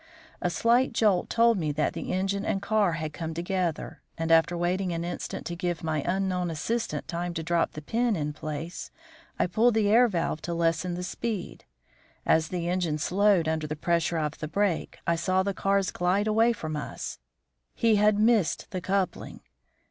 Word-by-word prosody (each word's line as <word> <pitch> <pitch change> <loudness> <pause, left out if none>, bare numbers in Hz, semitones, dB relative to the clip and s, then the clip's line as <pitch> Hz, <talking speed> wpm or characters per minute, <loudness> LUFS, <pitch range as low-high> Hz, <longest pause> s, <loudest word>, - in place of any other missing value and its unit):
A 180 - +1
slight 235 +8 +2
jolt 210 -5 +2
told 230 -2 +4
me 155 -3 -1
that 150 +1 0
the - - -5
engine 195 +2 -1
and 195 - 0
car 200 -2 +1
had 155 -2 -4
come 160 0 -5
together, 175 -1 -2 0.2
and 165 0 -1
after 165 +1 +4
waiting 180 +2 0
an 170 0 -2
instant 175 0 -5
to 170 - -4
give 175 -2 -3
my 155 -2 0
unknown 185 -1 0
assistant 225 +9 -2
time 175 0 -3
to 165 - -3
drop 170 +1 +1
the 155 - -8
pin 230 +5 +1
in 150 -3 -2
place, 155 +3 -6 0.5
I - - +2
pulled 220 +6 +3
the 210 -2 +3
air 240 +4 +6
valve 170 -6 -2
to 170 - -3
lessen 170 +1 0
the 180 - -4
speed. 200 +1 -4 0.6
As 160 -1 +3
the 175 0 -3
engine 175 -4 0
slowed 190 +1 +2
under 160 -1 -1
the 155 - -3
pressure 170 +1 0
of 155 -1 -2
the 155 - -4
brake, 195 +1 -1
I 170 - +2
saw 185 +3 +1
the 200 0 -1
cars 195 0 +1
glide 185 +4 +1
away 225 +2 +4
from 155 -9 -4
us. 150 - -5 0.6
He 225 -3 +3
had 210 0 +4
missed 220 -4 +2
the 185 -3 -3
coupling. 190 +1 -2
180 Hz, 185 wpm, -27 LUFS, 165-200 Hz, 0.6 s, air